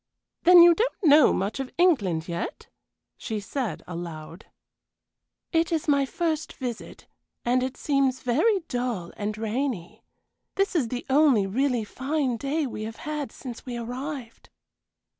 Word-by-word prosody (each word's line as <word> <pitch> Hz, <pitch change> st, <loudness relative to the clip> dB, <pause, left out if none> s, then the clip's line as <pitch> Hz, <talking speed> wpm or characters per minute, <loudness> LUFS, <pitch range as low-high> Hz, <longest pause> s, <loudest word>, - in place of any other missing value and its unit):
"Then 350 Hz, 0 st, +10 dB
you 345 Hz, 0 st, +8 dB
don't 455 Hz, +3 st, -2 dB
know 300 Hz, -3 st, +7 dB
much 200 Hz, +7 st, -2 dB
of 270 Hz, -1 st, -3 dB
England 205 Hz, -, +2 dB
yet?" 170 Hz, -1 st, -4 dB, 0.5 s
she 220 Hz, -2 st, -4 dB
said, 235 Hz, +3 st, -4 dB
aloud. 170 Hz, 0 st, -8 dB, 1.0 s
"It 330 Hz, 0 st, +1 dB
is 325 Hz, -2 st, -1 dB
my 280 Hz, -2 st, +3 dB
first 320 Hz, +1 st, -2 dB
visit; 245 Hz, -4 st, -7 dB, 0.4 s
and 250 Hz, +1 st, +2 dB
it 260 Hz, +1 st, -3 dB
seems 275 Hz, -3 st, +1 dB
very 365 Hz, -, +2 dB
dull 245 Hz, -, -3 dB
and 210 Hz, 0 st, -3 dB
rainy. 220 Hz, -4 st, -3 dB, 0.5 s
This 390 Hz, -1 st, 0 dB
is 285 Hz, -8 st, +2 dB
the 245 Hz, +1 st, -5 dB
only 270 Hz, -7 st, +4 dB
really 245 Hz, +3 st, 0 dB
fine 265 Hz, +2 st, -2 dB
day 285 Hz, +5 st, -1 dB
we 235 Hz, -4 st, -6 dB
have 225 Hz, 0 st, -6 dB
had 300 Hz, -5 st, -3 dB
since 245 Hz, -4 st, -9 dB
we 245 Hz, -2 st, -5 dB
arrived." 250 Hz, +1 st, -6 dB
255 Hz, 140 wpm, -26 LUFS, 220-300 Hz, 1.0 s, Then